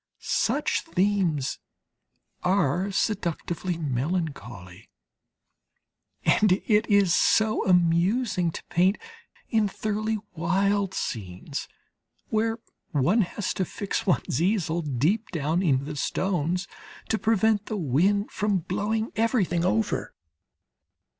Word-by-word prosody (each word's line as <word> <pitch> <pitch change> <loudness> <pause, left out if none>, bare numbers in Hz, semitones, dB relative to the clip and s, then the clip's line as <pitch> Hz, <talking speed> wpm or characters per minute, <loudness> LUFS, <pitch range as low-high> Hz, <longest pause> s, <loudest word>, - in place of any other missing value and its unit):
Such - - 0
themes 185 - 0 0.8
are 185 0 +1
seductively 180 -3 -2
melancholy, 130 - -4 1.4
and 210 -3 +4
it 210 +3 +1
is 200 -4 +4
so 220 0 +3
amusing 180 +3 +2
to - - -7
paint 185 +4 +2 0.5
in 220 -3 +2
thoroughly 215 +2 -2 0.2
wild 195 +4 +1
scenes 100 +6 -4 0.6
where 225 0 0 0.3
one 155 - +2
has 190 +1 -2
to 190 - -1
fix 200 +3 -4
one's 175 - +1
easel 175 -3 +1
deep 155 - 0
down 160 +1 0
in 140 -7 +2
the 150 0 -5
stones 180 +2 -1 0.4
to 220 - +1
prevent 220 -1 +2
the 215 - -3
wind 190 - +1
from 205 0 0
blowing 210 +6 -2
everything 210 -7 +1
over. 110 -9 0
185 Hz, 100 wpm, -26 LUFS, 160-210 Hz, 1.4 s, and